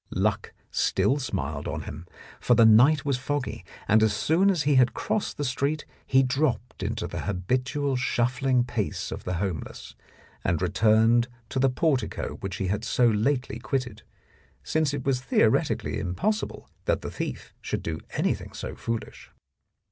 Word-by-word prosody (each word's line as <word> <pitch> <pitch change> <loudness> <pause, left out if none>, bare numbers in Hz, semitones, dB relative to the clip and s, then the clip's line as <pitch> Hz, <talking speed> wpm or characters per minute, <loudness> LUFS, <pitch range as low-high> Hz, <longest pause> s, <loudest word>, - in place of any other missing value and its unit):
Luck - - -1 0.2
still 140 +3 +2
smiled 75 - -3
on - - -3
him, 80 +4 -8 0.3
for 120 - +3
the 115 0 +6
night 135 +7 +6
was 140 -3 0
foggy, 145 +1 -3 0.2
and 110 +1 +5
as 110 -1 +3
soon 160 - +3
as 175 -6 +1
he 145 - +3
had 125 -2 +4
crossed 215 - -2
the 145 - -2
street 140 +3 -1 0.2
he 130 0 +5
dropped 125 -4 -1
into 110 +3 -2
the - - -5
habitual 125 +8 -1
shuffling 125 0 +1
pace 120 -5 -3
of - - -6
the 90 - -1
homeless, 90 -4 -4 0.5
and 85 -2 +1
returned 110 +5 +3 0.2
to 130 - -2
the 135 +1 +4
portico 135 0 -1
which 95 -1 -4
he 95 - -2
had 105 +3 -1
so 125 - +2
lately 125 +4 0
quitted, 125 -3 -3 0.6
since 155 -3 +1
it 140 -2 -4
was 135 -2 +1
theoretically - - +1
impossible 210 - -2 0.2
that - - +1
the - - -4
thief - - -5
should - - -3
do 80 -1 -3
anything - - -1
so - - -6
foolish. 115 -1 -5
125 Hz, 160 wpm, -26 LUFS, 105-140 Hz, 0.6 s, the